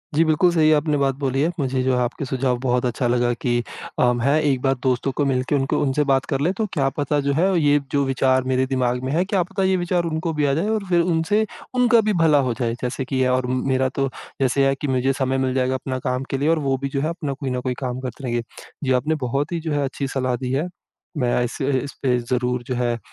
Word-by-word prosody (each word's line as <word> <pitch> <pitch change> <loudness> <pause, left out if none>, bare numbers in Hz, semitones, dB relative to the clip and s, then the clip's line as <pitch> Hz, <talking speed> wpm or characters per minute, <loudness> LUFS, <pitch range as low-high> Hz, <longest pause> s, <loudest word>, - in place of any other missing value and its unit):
जी, 160 - +5
बिल्कुल 160 +3 +3
सही 155 -2 +4
आपने 150 0 0
बात 135 -1 +1
बोली 135 -1 -1
है। 160 - +2
मुझे 130 -1 0
जो 130 0 +2
है, - - +1
आपके 130 +3 -3
सुझाव 130 -1 0
बहुत 125 -1 0
अच्छा 120 +1 0
लगा 120 0 +2
कि 120 0 -1 0.4
अ, 125 0 +4
मैं 135 +6 +2
एक 135 -4 +1
बार 135 -1 +2
दोस्तों 130 +1 +1
को 145 - +2
मिलके, 130 +1 0
उनको 135 0 0
उनसे 145 +1 +1
बात 135 -2 +2
कर - - +1
लें, 165 +5 +2
तो 220 +3 -1
क्या 135 -4 +1
पता, 145 0 0
जो 140 0 0
है, 165 +6 +2 0.2
ये 145 0 +4
जो 140 -1 +2
विचार 130 -1 +2
मेरे 130 0 +2
दिमाग 125 -2 0
में 130 - -2
हैं, 175 +4 +2
क्या 190 -2 +1
पता 195 +2 -3
ये 190 0 +3
विचार 175 0 0
उनको 160 0 -2
भी 150 -1 +1
आ 140 - +2
जाएँ 170 +9 0
और 215 -2 0
फिर 175 -1 +4
उनसे 180 +6 +1 0.3
उनका 245 -2 +4
भी - - +2
भला 155 -2 +5
हो - - 0
जाए। 115 -2 0
जैसे 130 +1 -3
कि 135 - -4
ये 130 - +3
और 125 0 +1 0.3
मेरा 130 0 +2
तो, 135 +1 -1 0.3
जैसे 135 +1 +3
है 135 - +2
कि 145 - -1
मुझे 130 +1 +1
समय 135 -1 0
मिल 130 -1 0
जाएगा 130 0 +1
अपना 130 0 -3
काम 125 +1 -1
के 135 - -1
लिए 145 +4 +1
और 165 -1 +3
वो 135 -2 0
भी 140 - -2
जो 135 0 -2
है, 155 - 0
अपना 155 -5 -3
कोई 135 -1 -5
ना 125 0 -1
कोई 125 0 -2
काम 125 -1 -3
करते 130 +1 -7
रहेंगे। 120 -1 -1 0.4
जी, 130 - 0
आपने 135 +5 +1
बहुत 140 +6 -1
ही 170 - -1
जो 160 -1 -4
है, 145 -1 +1
अच्छी 135 +1 -3
सलाह 130 -2 -1
दी 125 0 -4
है। 145 +7 0 0.5
मैं 125 -2 +1
इसे 130 +3 -2
इसपे 130 -3 -1
ज़रूर 125 0 -1
जो 125 +1 -3
है, 120 -1 0
135 Hz, 260 wpm, -22 LUFS, 130-150 Hz, 0.5 s, जी